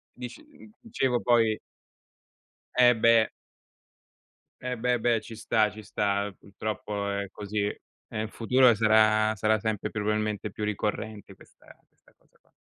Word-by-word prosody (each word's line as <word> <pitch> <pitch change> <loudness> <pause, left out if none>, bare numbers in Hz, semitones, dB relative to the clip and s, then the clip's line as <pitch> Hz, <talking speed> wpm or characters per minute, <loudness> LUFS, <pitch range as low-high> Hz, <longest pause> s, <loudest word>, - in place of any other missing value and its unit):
Dic 125 -1 -7
uhm, 275 -7 -17
dicevo 135 - -1
poi 115 -3 +3 1.2
Eh 125 -1 +7
beh. 115 0 +4 1.3
Eh 125 -1 -3
beh, 125 +1 +1
beh 115 0 +2
ci 115 - -10
sta, 110 -1 +1
ci 110 0 -11
sta, 100 0 -1
ehm, 105 - -7
purtroppo 100 0 -4
è 100 0 -2
così, 105 0 -3
e 105 +1 -8
in 110 - -4
futuro 125 +2 +4
sarà 110 0 +4
sarà 110 +1 +2
sempre 110 -1 -2
più 110 - -4
probabilmente 105 0 -1
più 105 - -6
ricorrente 105 0 -3
questa - - -19
questa - - -29
cosa - - -33
qua. - - -36
110 Hz, 145 wpm, -27 LUFS, 105-120 Hz, 1.3 s, Eh